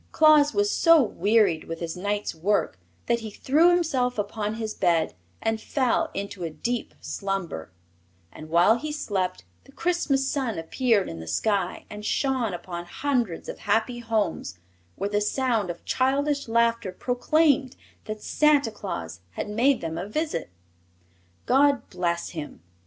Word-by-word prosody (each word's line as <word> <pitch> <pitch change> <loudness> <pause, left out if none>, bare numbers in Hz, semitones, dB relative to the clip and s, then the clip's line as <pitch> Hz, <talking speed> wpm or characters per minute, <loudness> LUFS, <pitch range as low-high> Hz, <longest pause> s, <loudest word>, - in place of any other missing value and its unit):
Claus 305 -2 +6
was 410 +3 +1
so 330 -1 +6
wearied 205 - +2
with 165 0 -6
his 165 -1 -4
night's 205 +3 -2
work 180 - 0 0.3
that 235 - +1
he 220 -1 -6
threw 295 +10 +3
himself 275 -9 +1
upon 210 +1 -2
his 220 -1 -4
bed 170 -3 +1 0.3
and 225 0 0
fell 255 -1 +1
into 200 -2 -5
a 165 - -2
deep 235 +9 -3
slumber, 195 - -4 0.6
and 155 0 -11
while 175 +8 +4
he 305 +3 -4
slept 190 -11 -2 0.2
the 275 - -17
Christmas 285 -5 0
sun 265 -6 -1
appeared 205 +5 +1
in 80 - -6
the 80 - -8
sky 200 - -1
and 210 0 -8
shone 255 -1 0
upon 175 0 -6
hundreds 240 -5 -1
of - - -6
happy 225 +4 0
homes 215 - -2 0.4
where 200 - -2
the 205 0 +1
sound 225 -3 0
of 175 - -7
childish 280 +2 +1
laughter 230 -3 +1
proclaimed 260 - +1 0.3
that 215 0 -6
Santa 295 -5 +3
Claus 85 - -6
had - - -4
made 255 +6 +3
them 165 0 -4
a 190 +3 -5
visit. 300 - -2 1.0
God 280 +1 +3
bless 170 -1 -1
him! 150 - -8
220 Hz, 150 wpm, -26 LUFS, 180-270 Hz, 1.0 s, Claus